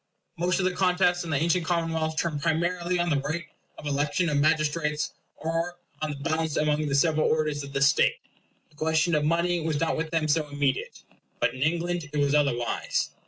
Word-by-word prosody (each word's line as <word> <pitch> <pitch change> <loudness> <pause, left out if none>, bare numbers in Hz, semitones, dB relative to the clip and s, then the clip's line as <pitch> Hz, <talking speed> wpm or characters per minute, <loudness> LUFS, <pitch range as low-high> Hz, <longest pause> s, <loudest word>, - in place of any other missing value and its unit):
Most 175 +2 +1
of 190 - +1
the 185 - +2
contests 180 -1 +2
in 170 - -7
the 145 - +1
ancient 170 +4 +1
commonwealths 160 -2 -1
turned 155 -4 -1
primarily 170 +2 0
on 175 -1 0
the 145 - +2
right 155 +5 -3 0.3
of - - -10
election 145 +4 0
of 150 - 0
magistrates; 150 0 +1 0.2
or 165 +2 -2 0.2
on 155 - -1
the 145 - -4
balance 160 +1 -1
among 150 0 +1
the 140 - 0
several 155 +2 +3
orders 155 -2 0
of 140 0 -8
the 140 0 -2
state. 140 - +4 0.6
The - - -25
question 160 +2 +1
of 150 -1 +2
money 170 +3 +1
was 155 -2 -1
not 165 - +1
with 160 0 -2
them 160 -1 0
so 155 0 +1
immediate. 145 -2 -2 0.4
But - - +1
in 130 - -8
England 170 +1 0
it 150 - -3
was 145 -1 +2
otherwise. 140 -6 0
155 Hz, 200 wpm, -27 LUFS, 150-170 Hz, 0.6 s, state